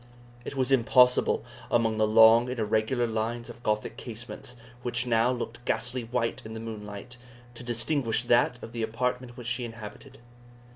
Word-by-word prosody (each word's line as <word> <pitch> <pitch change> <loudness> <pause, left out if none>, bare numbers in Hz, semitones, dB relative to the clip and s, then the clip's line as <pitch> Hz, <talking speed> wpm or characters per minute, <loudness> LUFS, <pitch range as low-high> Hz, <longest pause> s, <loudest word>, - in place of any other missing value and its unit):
It 140 - -6
was 130 0 0
impossible, 125 0 +4 0.2
among 115 -2 +2
the 110 0 +3
long 115 +2 +7
and 125 - -4
irregular 110 +3 +1
lines 115 +1 -3
of 120 0 -15
Gothic 105 -2 -1
casements, 120 +1 -8 0.3
which 120 +1 -2
now 120 0 +3
looked 120 -1 -5
ghastly 125 -1 -2
white 115 0 -1
in 110 0 -8
the - - -5
moonlight, 110 +1 -8 0.4
to 120 - -11
distinguish 120 0 -1
that 120 0 +2
of 115 - -8
the 115 -1 -4
apartment 125 +2 -2
which 120 - -8
she 120 +1 -2
inhabited. 115 +3 -9
120 Hz, 160 wpm, -28 LUFS, 110-125 Hz, 0.4 s, long